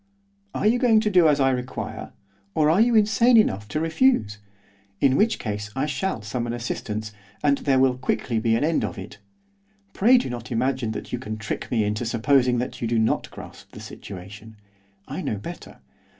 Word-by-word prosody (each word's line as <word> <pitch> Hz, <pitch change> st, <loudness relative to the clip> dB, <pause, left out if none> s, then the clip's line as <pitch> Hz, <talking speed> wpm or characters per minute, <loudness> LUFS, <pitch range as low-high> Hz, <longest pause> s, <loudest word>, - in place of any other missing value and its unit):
'Are -, -, -2 dB
you 235 Hz, +3 st, +3 dB
going 230 Hz, -4 st, +4 dB
to 210 Hz, -1 st, 0 dB
do 180 Hz, -4 st, +5 dB
as 150 Hz, -2 st, +3 dB
I 135 Hz, -1 st, +3 dB
require, 125 Hz, 0 st, -5 dB, 0.4 s
or 155 Hz, 0 st, +3 dB
are 180 Hz, +6 st, +4 dB
you 235 Hz, 0 st, +3 dB
insane 220 Hz, +3 st, +4 dB
enough 105 Hz, -, +2 dB
to 155 Hz, -, -3 dB
refuse? 160 Hz, -, +1 dB, 0.6 s
in 135 Hz, -1 st, +3 dB
which 220 Hz, +5 st, +2 dB
case 105 Hz, -1 st, -5 dB
I 135 Hz, +2 st, 0 dB
shall 145 Hz, -, -3 dB
summon 120 Hz, +2 st, -3 dB
assistance, 110 Hz, -2 st, -4 dB, 0.3 s
and 140 Hz, -1 st, +3 dB
there 135 Hz, -2 st, +1 dB
will 130 Hz, -1 st, +2 dB
quickly 120 Hz, -2 st, -1 dB
be 115 Hz, 0 st, +1 dB
an 115 Hz, -, 0 dB
end 160 Hz, +1 st, +1 dB
of -, -, -4 dB
it. -, -, -9 dB, 0.7 s
Pray 245 Hz, +6 st, +5 dB
do 245 Hz, -, -1 dB
not 120 Hz, -2 st, -7 dB
imagine 125 Hz, -1 st, -1 dB
that -, -, -7 dB
you 125 Hz, -, -1 dB
can 110 Hz, -3 st, -6 dB
trick 110 Hz, 0 st, -5 dB
me 115 Hz, -3 st, +1 dB
into 105 Hz, +3 st, -2 dB
supposing 125 Hz, +2 st, +2 dB
that 125 Hz, +2 st, -4 dB
you 115 Hz, -, -1 dB
do 115 Hz, 0 st, 0 dB
not 110 Hz, 0 st, 0 dB
grasp -, -, -12 dB
the -, -, -10 dB
situation. 100 Hz, +3 st, -10 dB, 0.5 s
I -, -, -5 dB
know -, -, -2 dB
better. 100 Hz, -, -10 dB
125 Hz, 195 wpm, -24 LUFS, 110-160 Hz, 0.7 s, do